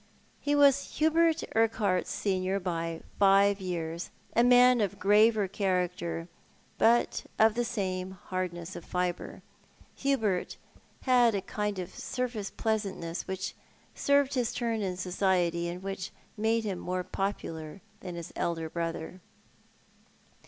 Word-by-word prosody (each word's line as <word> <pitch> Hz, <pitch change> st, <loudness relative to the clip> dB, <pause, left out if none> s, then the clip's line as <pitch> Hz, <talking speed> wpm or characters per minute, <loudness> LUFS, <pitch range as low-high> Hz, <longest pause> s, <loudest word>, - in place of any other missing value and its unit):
He 290 Hz, 0 st, 0 dB
was 280 Hz, -1 st, +4 dB
Hubert 320 Hz, +1 st, +3 dB
Urquhart's 220 Hz, -5 st, +2 dB
senior 190 Hz, -1 st, 0 dB
by 165 Hz, -3 st, -3 dB, 0.2 s
five 200 Hz, 0 st, +5 dB
years, 170 Hz, -2 st, -4 dB, 0.3 s
a 235 Hz, -, +5 dB
man 245 Hz, 0 st, +6 dB
of 200 Hz, -4 st, -1 dB
graver 210 Hz, +1 st, +4 dB
character, 180 Hz, -3 st, -1 dB, 0.5 s
but 235 Hz, +1 st, +3 dB
of 220 Hz, 0 st, +5 dB
the 240 Hz, +2 st, 0 dB
same 190 Hz, -6 st, -2 dB, 0.2 s
hardness 175 Hz, -2 st, -3 dB
of -, -, -7 dB
fibre. 180 Hz, -1 st, -3 dB, 0.5 s
Hubert 225 Hz, -10 st, 0 dB, 0.5 s
had 245 Hz, -4 st, +4 dB
a 195 Hz, -, 0 dB
kind 210 Hz, 0 st, -2 dB
of 185 Hz, 0 st, -5 dB
surface 245 Hz, -6 st, -3 dB
pleasantness 195 Hz, -6 st, -2 dB
which 190 Hz, 0 st, -3 dB, 0.4 s
served 280 Hz, -1 st, +2 dB
his 245 Hz, -3 st, 0 dB
turn 230 Hz, -3 st, -1 dB
in 185 Hz, -2 st, -2 dB
society, 180 Hz, -2 st, +1 dB
and 180 Hz, +2 st, -6 dB
which 195 Hz, -1 st, -4 dB, 0.3 s
made 225 Hz, +1 st, +1 dB
him 195 Hz, -4 st, -3 dB
more 180 Hz, 0 st, -2 dB
popular 165 Hz, -5 st, -4 dB, 0.2 s
than 180 Hz, -2 st, -7 dB
his 170 Hz, -1 st, -7 dB
elder 165 Hz, -2 st, -2 dB
brother. 170 Hz, +1 st, -4 dB
195 Hz, 125 wpm, -29 LUFS, 180-225 Hz, 0.5 s, man